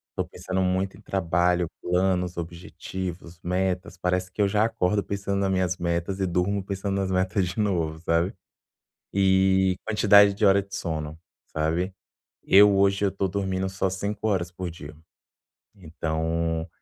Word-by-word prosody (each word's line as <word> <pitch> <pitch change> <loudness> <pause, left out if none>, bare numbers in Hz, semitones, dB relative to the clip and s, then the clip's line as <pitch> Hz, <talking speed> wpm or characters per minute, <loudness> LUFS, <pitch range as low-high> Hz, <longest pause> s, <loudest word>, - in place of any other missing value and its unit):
eu - - 0
tô - - -16
pensando 95 0 -3
muito 95 0 0
em 100 - -16
trabalho, 90 -2 +1
planos, 90 0 0
objetivos, 85 0 -6
metas, 90 +2 -1
parece 90 0 -1
que - - -20
eu - - +3
já 105 +2 +2
acordo 105 -3 +1
pensando 100 0 -2
nas 100 - +1
minhas 90 -1 0
metas 85 +2 -2
e 95 - 0
durmo 90 +3 0
pensando 100 0 -3
nas 95 - -2
metas 95 0 +1
de 90 +5 -5
novo, 85 -6 0
sabe. 85 +2 +1 0.8
E 95 -1 +3
quantidade 105 -2 +6
de 105 - -1
hora 100 0 +5
de 100 0 -11
sono, 80 -3 -4 0.3
sabe, 85 +5 -1 0.5
eu 100 +1 +6
hoje 100 +1 +3
eu 100 - +1
tô 100 0 -1
dormindo 95 0 -2
só 95 0 -1
5 100 +3 -3
horas 95 -5 0
por 90 -1 -5
dia, 80 -2 -10 0.8
então 80 -1 -2
95 Hz, 155 wpm, -25 LUFS, 85-100 Hz, 0.8 s, quantidade